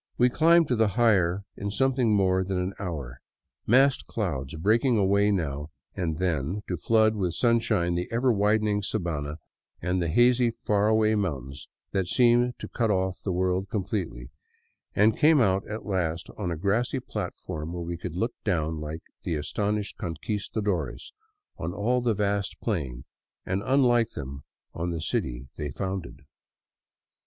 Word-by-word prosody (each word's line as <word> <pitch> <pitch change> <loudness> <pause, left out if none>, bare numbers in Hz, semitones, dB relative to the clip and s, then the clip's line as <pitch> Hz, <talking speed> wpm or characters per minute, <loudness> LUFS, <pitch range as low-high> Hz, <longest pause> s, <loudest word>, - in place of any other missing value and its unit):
We 125 +1 +5
climbed 165 +2 +5
to 125 - +2
the 110 -1 +3
higher 100 -5 +3
in 100 - -4
something 130 +1 +2
more 95 -1 +3
than 95 0 -2
an 90 +1 -1
hour, 70 -10 -5 0.5
massed 135 +4 +4
clouds 75 - -3
breaking 115 - +2
away 100 +1 +3
now 75 -6 -1 0.2
and 85 -5 -2
then 90 +2 -1
to 90 - -1
flood 110 +4 +3
with 90 -5 -1
sunshine 115 -7 +2
the 90 +1 -3
ever 120 +2 +2
widening 105 0 +2
sabana 80 -8 -3 0.4
and 90 +2 -1
the 85 - 0
hazy, 120 +6 +4
far 105 0 +3
away 110 0 +3
mountains 70 - -3 0.2
that 95 -2 0
seemed 120 +2 +3
to - - -7
cut 115 -2 -1
oflf 95 -2 0
the 95 - -2
world 95 +2 0
completely, 95 - -3 0.6
and 105 +2 +3
came 155 0 +6
out 95 -4 +2
at 110 +1 -5
last 85 -4 -2
on 100 -4 -3
a 85 - -2
grassy 110 - 0
platform 80 -9 -5
where 85 0 -4
we 85 +1 -4
could 85 0 -6
look 115 +6 -1
down, 80 -5 0
like 75 +2 -6 0.2
the 85 - -2
astonished 105 +7 -2
Conquistadores, 95 0 -3 0.5
on 85 - -3
all 125 +5 +1
the 120 -3 +1
vast 100 -1 -1
plain, 70 - -3 0.4
and, 95 +1 -1
unlike 125 -4 +3
them, 70 -2 -6 0.3
on 85 +2 -3
the 85 -1 -3
city 65 -4 -2
they 75 - -3
founded. 95 +3 -5
95 Hz, 155 wpm, -27 LUFS, 85-110 Hz, 0.6 s, came